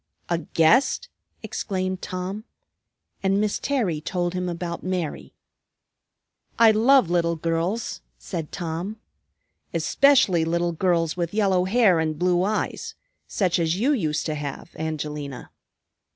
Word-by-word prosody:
"A 170 -1 +1
guest?" 170 - +2 0.3
exclaimed 185 -2 -3
Tom. 185 +3 -4 0.8
And 195 +1 +2
Miss 210 -1 0
Terry 215 - -1
told 175 +1 -2
him 180 0 -2
about 170 0 -4
Mary. 180 -4 -4 1.2
"I 230 -1 +7
love 225 -2 +4
little 170 -1 +2
girls," 165 +7 -2 0.2
said 60 - -6
Tom, 175 +5 -4 0.8
"especially 260 -12 +4
little 170 +1 0
girls 165 -2 +1
with 175 +1 -3
yellow 190 -4 +2
hair 195 -4 +4
and 155 -1 -1
blue 180 +1 +2
eyes, 210 +3 -2 0.3
such 185 -4 +1
as 165 +2 0
you 260 +7 +3
used 160 - -1
to 155 - -1
have, 145 +2 -6
Angelina." 150 -4 -5
175 Hz, 125 wpm, -24 LUFS, 165-200 Hz, 1.2 s, I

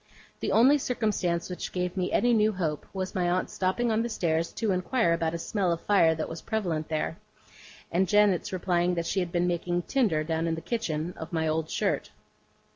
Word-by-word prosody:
The - - -2
only 270 +6 +5
circumstance 210 -9 -1
which 180 - -5
gave 180 0 -2
me 185 -2 -1
any 245 0 +3
new 215 -1 +3
hope, 160 -6 -3
was 190 -1 -4
my 180 -2 +1
aunt's 180 +1 -1
stopping 210 +6 0
on 220 0 +2
the 235 - -2
stairs 165 -6 0
to 220 -3 -1
inquire 185 +1 +1
about 165 0 -1
a - - -1
smell 185 +1 -1
of 170 - -1
fire 170 -6 +4
that 160 - -3
was 165 - -7
prevalent 175 -9 -2
there; 160 +1 -2 0.7
and 185 +3 +2
janet's 205 -3 +3
replying 180 -1 +1
that 170 -1 -2
she 190 - 0
had 180 -2 -2
been 175 0 +1
making 175 0 -1
tinder 205 - +1
down 160 +1 -1
in 165 - 0
the - - -5
kitchen, 175 -8 -2
of 160 0 -7
my 160 -2 0
old 155 0 -1
shirt. - - -1
180 Hz, 205 wpm, -28 LUFS, 165-205 Hz, 0.7 s, only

